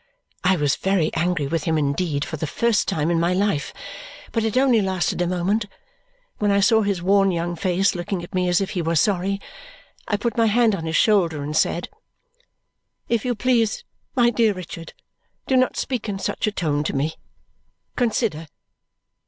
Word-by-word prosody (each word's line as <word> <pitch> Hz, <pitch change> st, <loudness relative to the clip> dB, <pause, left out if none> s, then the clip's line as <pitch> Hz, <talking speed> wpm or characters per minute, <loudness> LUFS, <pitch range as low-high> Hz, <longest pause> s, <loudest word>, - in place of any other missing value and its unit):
I 190 Hz, +1 st, +4 dB
was 145 Hz, -4 st, +1 dB
very 190 Hz, -5 st, +1 dB
angry 170 Hz, -2 st, 0 dB
with 160 Hz, +2 st, -2 dB
him 160 Hz, -1 st, +1 dB
indeed, 145 Hz, 0 st, 0 dB
for -, -, -5 dB
the 155 Hz, +1 st, -3 dB
first 235 Hz, +6 st, +1 dB
time 165 Hz, -4 st, 0 dB
in 170 Hz, -, +2 dB
my 175 Hz, +2 st, +1 dB
life, 190 Hz, -7 st, 0 dB, 0.6 s
but 225 Hz, -, 0 dB
it 220 Hz, +2 st, 0 dB
only 255 Hz, -4 st, +4 dB
lasted 185 Hz, -2 st, -1 dB
a 175 Hz, -, +1 dB
moment. 190 Hz, +5 st, 0 dB, 0.7 s
When 210 Hz, -, +1 dB
I 200 Hz, 0 st, +3 dB
saw 220 Hz, +2 st, +4 dB
his 200 Hz, -4 st, -1 dB
worn 195 Hz, +1 st, +4 dB
young 175 Hz, -1 st, -2 dB
face 185 Hz, +3 st, +1 dB
looking 175 Hz, +1 st, -4 dB
at 175 Hz, -, -11 dB
me 180 Hz, -1 st, +1 dB
as 175 Hz, -, +3 dB
if 195 Hz, -, -2 dB
he 180 Hz, -, -2 dB
were 165 Hz, 0 st, -1 dB
sorry, 195 Hz, +3 st, +1 dB, 0.7 s
I 205 Hz, -, 0 dB
put 235 Hz, +3 st, -2 dB
my 230 Hz, -1 st, +4 dB
hand 225 Hz, 0 st, +3 dB
on 165 Hz, -4 st, -3 dB
his 160 Hz, -, -2 dB
shoulder 170 Hz, -9 st, +3 dB
and 150 Hz, +2 st, -4 dB
said, 170 Hz, -, +1 dB, 1.2 s
"If 235 Hz, -2 st, +1 dB
you 245 Hz, -1 st, 0 dB
please, 235 Hz, -, +1 dB, 0.3 s
my 240 Hz, -2 st, +4 dB
dear 225 Hz, -2 st, +2 dB
Richard, 170 Hz, -3 st, -8 dB, 0.5 s
do 265 Hz, -, +1 dB
not 255 Hz, -1 st, +2 dB
speak 245 Hz, -4 st, -3 dB
in 200 Hz, -, -2 dB
such 195 Hz, -, -2 dB
a -, -, +1 dB
tone 150 Hz, -7 st, -1 dB
to -, -, -2 dB
me. 150 Hz, +4 st, 0 dB, 0.8 s
Consider!" 220 Hz, -, 0 dB
185 Hz, 185 wpm, -22 LUFS, 165-215 Hz, 1.2 s, I